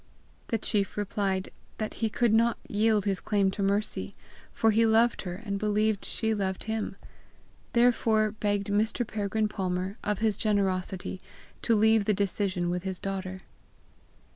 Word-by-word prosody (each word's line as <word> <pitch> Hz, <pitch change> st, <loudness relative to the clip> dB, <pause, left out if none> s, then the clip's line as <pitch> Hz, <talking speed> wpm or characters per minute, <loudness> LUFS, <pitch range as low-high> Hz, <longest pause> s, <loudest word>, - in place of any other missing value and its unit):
The 225 Hz, -, 0 dB
chief 205 Hz, -2 st, -1 dB
replied 195 Hz, -2 st, -1 dB, 0.3 s
that 215 Hz, -1 st, -3 dB
he 225 Hz, -, +2 dB
could 235 Hz, 0 st, +2 dB
not 230 Hz, +1 st, +3 dB
yield 210 Hz, -1 st, +2 dB
his 195 Hz, -2 st, 0 dB
claim 200 Hz, -2 st, +1 dB
to 200 Hz, -, -5 dB
Mercy, 200 Hz, +2 st, -1 dB, 0.4 s
for 225 Hz, -, +2 dB
he 225 Hz, +2 st, +3 dB
loved 225 Hz, +1 st, +3 dB
her, 180 Hz, -2 st, -5 dB
and 200 Hz, 0 st, -4 dB
believed 210 Hz, 0 st, +1 dB
she 220 Hz, -1 st, 0 dB
loved 190 Hz, -3 st, -2 dB
him; 220 Hz, -3 st, -3 dB, 0.8 s
therefore 225 Hz, -3 st, +3 dB
begged 205 Hz, -1 st, -1 dB
Mr. 220 Hz, +4 st, +1 dB
Peregrine 215 Hz, 0 st, -1 dB
Palmer, 190 Hz, -1 st, -3 dB
of 210 Hz, -1 st, 0 dB
his 215 Hz, -1 st, +1 dB
generosity, 190 Hz, -3 st, -1 dB, 0.4 s
to 230 Hz, -, +2 dB
leave 220 Hz, 0 st, +4 dB
the 210 Hz, -, +2 dB
decision 190 Hz, -3 st, 0 dB
with 180 Hz, 0 st, -1 dB
his 190 Hz, 0 st, -3 dB
daughter. 190 Hz, -1 st, -5 dB
205 Hz, 150 wpm, -28 LUFS, 195-220 Hz, 0.8 s, leave